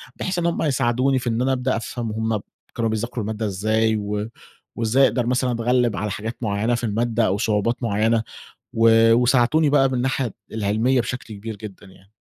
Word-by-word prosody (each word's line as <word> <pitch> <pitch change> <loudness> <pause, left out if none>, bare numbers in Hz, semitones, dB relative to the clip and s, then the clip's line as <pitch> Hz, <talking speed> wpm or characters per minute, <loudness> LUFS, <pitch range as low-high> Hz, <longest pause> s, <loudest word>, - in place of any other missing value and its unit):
بحيث 185 -1 -2
إن 170 - -1
هُم 170 - 0
يساعدوني 130 -2 +1
في 125 - -3
إن 115 +1 -1
أنا 135 +1 +1
أبدأ 130 0 0
أفهَم 115 0 -5
هُم 110 0 -1
ب - - -8 0.3
كانوا 115 -1 0
بيذاكروا 115 +1 -3
المادة 110 +1 -3
إزاي 110 +3 +1
و 105 +1 -3 0.5
وإزاي 115 +4 +2
أقدَر 125 -2 -1
مثلًا 125 0 +1
أتغلّب 120 -1 +1
على 105 +3 -2
حاجات 110 +3 -5
معيّنة 110 +3 0
في 120 - -5
المادة 115 +1 0
أو 95 - 0
صعوبات 110 +2 0
معيّنة 110 +1 +1 0.5
و 115 0 +5
وساعدوني 125 +5 +3
بقى 135 -2 +4
من 130 - -3
الناحية 130 -2 -1 0.2
العِلمية 110 +5 +1
بشكْل 120 -1 -5
كبير 105 +2 -7
جدًا 100 -1 -10
يعني. 95 +1 -20
115 Hz, 185 wpm, -22 LUFS, 110-125 Hz, 0.5 s, و